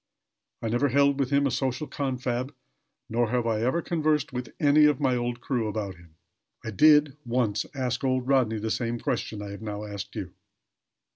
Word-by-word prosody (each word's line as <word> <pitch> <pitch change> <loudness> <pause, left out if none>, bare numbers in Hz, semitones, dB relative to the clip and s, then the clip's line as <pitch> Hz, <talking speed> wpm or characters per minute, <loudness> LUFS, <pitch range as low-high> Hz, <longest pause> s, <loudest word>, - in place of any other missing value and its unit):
I 115 - -1
never 120 +5 +2
held 140 +2 +3
with 135 -2 +1
him 140 0 +3
a 135 - +1
social 130 +2 -1
confab; 130 -1 -3 0.5
nor 120 0 0
have 120 0 0
I 110 -2 0
ever 130 +8 +1
conversed 155 -4 0
with 125 -2 -4
any 150 0 +5
of 150 -3 +3
my 130 -3 +2
old 120 0 -2
crew 120 -4 -1
about 105 -2 -3
him. 85 -2 -19 0.5
I 110 - -3
did, 150 +4 +5
once, 115 -4 0
ask 130 -1 -2
old 130 -1 0
Rodney 130 -5 +2
the 110 +1 -3
same 120 0 -1
question 105 -2 -3
I 100 - -6
have 100 - -8
now 105 -1 -5
asked 100 -2 -7
you." - - -5
125 Hz, 190 wpm, -27 LUFS, 110-140 Hz, 0.5 s, any